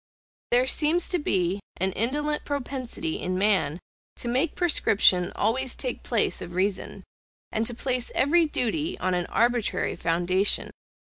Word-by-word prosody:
There 245 +1 +3
seems 315 +5 +2
to 360 - 0
be 190 - 0 0.2
an 190 +2 +1
indolent 295 +9 0
propensity 260 - -4
in 185 0 -2
man 185 -6 +1 0.4
to - - -6
make 265 +7 0
prescription 200 - +3
always 250 +4 0
take 250 -2 -3
place 230 -4 0
of 175 - -8
reason, 190 +1 -2 0.5
and 220 0 0
to 240 - -3
place 250 0 -1
every 325 +5 +3
duty 300 +5 -1
on 185 0 -1
an 175 -1 -1
arbitrary 240 -1 0
foundation. 175 +4 +1
235 Hz, 140 wpm, -26 LUFS, 185-280 Hz, 0.5 s, There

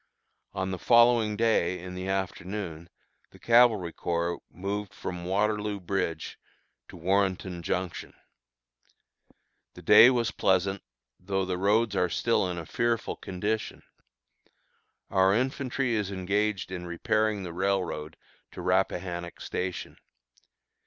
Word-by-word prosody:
On 95 -1 -2
the 95 - -4
following 120 -2 +4
day 110 -5 +2
in 90 +1 -8
the 90 +1 -5
afternoon 95 -3 -4 0.4
the - - -17
Cavalry 115 -8 +4
Corps 85 0 -2
moved 100 +2 -5
from 90 -1 -6
Waterloo 105 +2 0
Bridge 85 -4 -3 0.5
to - - -12
Warrenton 95 0 0
Junction. 90 +1 -3 1.6
The - - -12
day 120 - +9
was 120 -3 +1
pleasant, 95 +1 +1 0.4
though 95 +1 -1
the 90 -1 -3
roads 105 +2 +2
are 90 -2 +2
still 115 -3 +1
in 90 - -4
a 85 - -5
fearful 115 +5 -1
condition. 105 +4 -3 1.3
Our 95 0 +4
infantry 130 0 -1
is 105 -3 -1
engaged 100 +1 -1
in 90 -1 -5
repairing 105 +4 0
the 85 -2 -6
railroad 90 -5 -2 0.4
to - - -7
Rappahannock 90 -1 -1
Station. 90 0 -4
95 Hz, 120 wpm, -28 LUFS, 90-105 Hz, 1.6 s, day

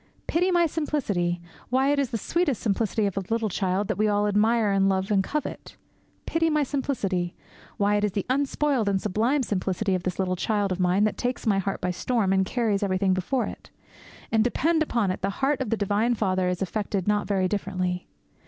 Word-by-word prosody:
Pity 355 +3 +1
my 345 -2 +4
simplicity! 205 - -1 0.3
Why, 260 +2 +2
it 290 - +2
is 275 -3 0
the 230 - -2
sweet 340 - 0
simplicity 215 +1 0
of 200 -1 -2
a 195 - 0
little 225 -1 0
child 190 +1 -1
that 215 - -2
we 215 - +3
all 205 0 +2
admire 210 +1 +2
and 195 0 +3
love 190 +2 0
and 195 -2 +3
covet! 300 +7 -5 0.5
Pity 330 0 +1
my 300 -1 +2
simplicity! 205 -11 -2 0.4
Why, 205 0 +2
it 205 - -1
is 210 -3 0
the 200 - -2
unspoiled 275 -3 +1
and 195 -1 +1
sublime 225 +8 +1
simplicity 195 -1 -1
of 185 - 0
this 180 -1 -3
little 185 -1 0
child 205 +1 0
of 185 - -2
mine 180 +3 +3
that 215 - +1
takes 250 +1 -2
my 200 -3 +3
heart 195 0 -3
by 180 - 0
storm 200 +1 0
and 190 -1 +2
carries 220 -4 0
everything 190 -1 +1
before 190 +8 0
it. - - -9 0.6
And, 220 -1 +4
depend 315 +7 +1
upon 235 -10 +1
it, - - -5
the 195 - 0
heart 275 +1 +1
of 255 - -2
the 225 - +1
divine 210 +4 +1
Father 185 -4 +1
is 180 +1 -1
affected 200 -1 -2
not 210 0 +1
very 190 -2 +1
differently. 185 -2 -2
205 Hz, 210 wpm, -26 LUFS, 190-245 Hz, 0.6 s, my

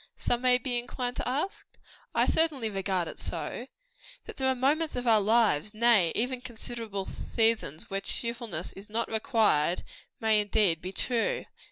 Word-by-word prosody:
some 240 0 0
may 250 -1 +5
be 245 -1 -1
inclined 245 +1 -4
to - - -3
ask. 290 +10 -3 0.4
I - - +4
certainly 285 -9 +2
regard 190 -3 -1
it - - -8
so. 245 - -4 0.6
That - - -9
there 265 -2 +1
are 260 - +2
moments 295 +5 +1
of 250 0 -3
our 220 -3 +5
lives 215 -3 +2
nay, 215 -7 +4
even 250 +2 -1
considerable 225 -4 -5
seasons 220 -11 0
when 195 0 -1
cheerfulness 235 -9 -3
is 200 +2 -11
not 230 +2 -1
required, 215 - +2 0.4
may, 220 -3 +3
indeed, 200 -5 +2
be 185 - -5
true. 250 - -1
230 Hz, 160 wpm, -29 LUFS, 200-250 Hz, 0.6 s, may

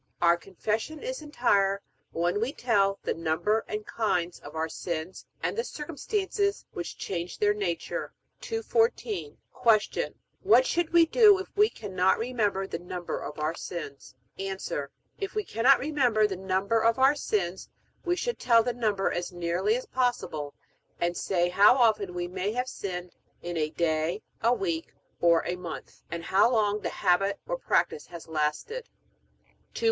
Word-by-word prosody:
Our 170 0 +5
Confession 215 - -3
is - - -4
entire, 200 -9 +1 0.3
when 175 +5 0
we 250 +5 -1
tell 200 -7 +2
the - - 0
number 165 +7 0
and 210 0 -4
kinds 180 -6 -1
of 145 +2 -11
our 160 0 0
sins 170 +2 -5 0.2
and - - 0
the 465 - 0
circumstances 400 - -2
which 175 - -5
change 175 -1 -4
their 205 0 +3
nature. 190 -5 -3 0.3
214. 450 -1 -1 0.2
Q. 215 -2 +2 0.3
What 420 +5 +5
should 345 -7 0
we 340 -1 +7
do 415 +3 +6
if 380 - -8
we 420 +1 +5
cannot 190 - +1
remember 220 -5 0
the 165 -3 -5
number 175 0 -5
of 145 +1 -7
our 155 +1 -1
sins? 150 -7 -7 0.2
A. 195 0 -3 0.6
If 390 +1 -4
we 425 - 0
cannot 250 - +4
remember 250 -7 +2
the 200 -2 -1
number 190 +4 0
of 230 +2 +3
our 265 +2 +6
sins, 190 -10 -2 0.3
we 350 0 +1
should 480 +6 -2
tell 230 -2 +5
the 245 - -1
number 210 -5 0
as 175 0 -3
nearly 175 +5 0
as 250 - -3
possible, 200 - -1 0.4
and 175 0 0
say 175 -1 +1
how 200 +6 +6
often 215 -7 +2
we 175 0 -2
may 185 +3 -2
have 250 +2 -1
sinned 180 -6 -5 0.3
in 175 0 -4
a 155 -2 0
day, 160 +3 0 0.2
a 230 - +4
week, 330 +3 -2 0.2
or 170 -1 +4
a 175 - -1
month, 175 -3 -8
and 170 0 -5
how 195 +7 +4
long 210 -3 +2
the - - -3
habit 195 +1 +2
or - - -1
practice 460 - 0
has 170 -2 -10
lasted. 160 - -2 0.9
215. - - -5
205 Hz, 160 wpm, -28 LUFS, 175-255 Hz, 0.9 s, we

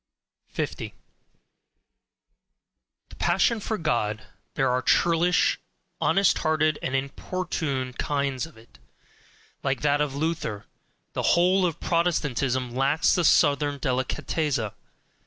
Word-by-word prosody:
50. - - -5 2.1
The - - -13
passion 230 -2 +2
for 220 +1 -3
God: 115 - -1 0.3
there 135 -2 +2
are 125 0 +1
churlish, 175 +4 +3 0.4
honest 195 -1 +3
hearted, 155 -1 +1
and 130 - -2
importunate 140 -2 -3
kinds 140 0 -1
of 155 - -18
it, 110 - -19 0.8
like 135 -1 -1
that 145 0 +2
of 145 -2 -1
Luther 150 -9 -2 0.5
the - - -2 0.2
whole 180 +1 +4
of 165 - -5
Protestantism 135 -7 0
lacks 140 +5 +2
the 175 - +1
southern 145 -2 +3
DELICATEZZA. 130 -1 -1
145 Hz, 105 wpm, -25 LUFS, 130-165 Hz, 2.1 s, whole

